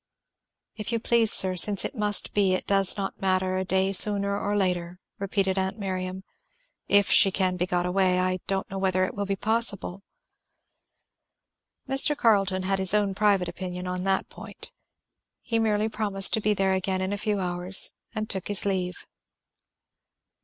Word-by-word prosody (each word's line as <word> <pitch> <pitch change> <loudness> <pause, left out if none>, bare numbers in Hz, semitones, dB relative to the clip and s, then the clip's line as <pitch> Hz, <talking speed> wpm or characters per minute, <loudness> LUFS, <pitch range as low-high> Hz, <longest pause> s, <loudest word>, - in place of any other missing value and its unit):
"If 215 +1 -5
you 230 - 0
please, 230 -1 +2
sir, 185 -1 +3
since 200 +2 +1
it - - -5
must 210 -4 +1
be, 195 -2 +1
it - - -5
does 195 0 +3
not 195 -1 -5
matter 185 -1 0
a 190 - -2
day 190 +1 0
sooner 200 0 +5
or 205 0 -2
later," 180 -2 -2 0.2
repeated 195 -1 -1
aunt 190 +2 -3
Miriam, 185 -2 -5 0.6
"if 200 -1 +2
she 195 - +6
can 185 -1 -1
be 180 0 -2
got 180 -1 -1
away. 185 0 +1
I 185 0 -1
don't 195 0 -2
know 195 - -5
whether 185 -1 0
it - - -7
will 200 -1 -5
be 195 - -1
possible." 205 -3 0 1.9
Mr. 270 +2 +4
Carleton 195 -6 +1
had 195 +1 -1
his 190 +1 +4
own 205 -2 0
private 200 -3 +1
opinion 180 +1 -7
on 180 0 -4
that 195 0 -1
point. - - -8 0.7
He 230 -1 -2
merely 215 -1 0
promised 205 -3 +2
to 220 - +1
be 210 0 0
there 195 -1 0
again 190 0 -2
in 190 +2 -3
a - - -3
few 210 -1 -2
hours 180 +1 0 0.2
and 215 0 -4
took 190 -4 -4
his 205 -1 +1
leave. 185 -2 -3
195 Hz, 175 wpm, -25 LUFS, 185-205 Hz, 1.9 s, she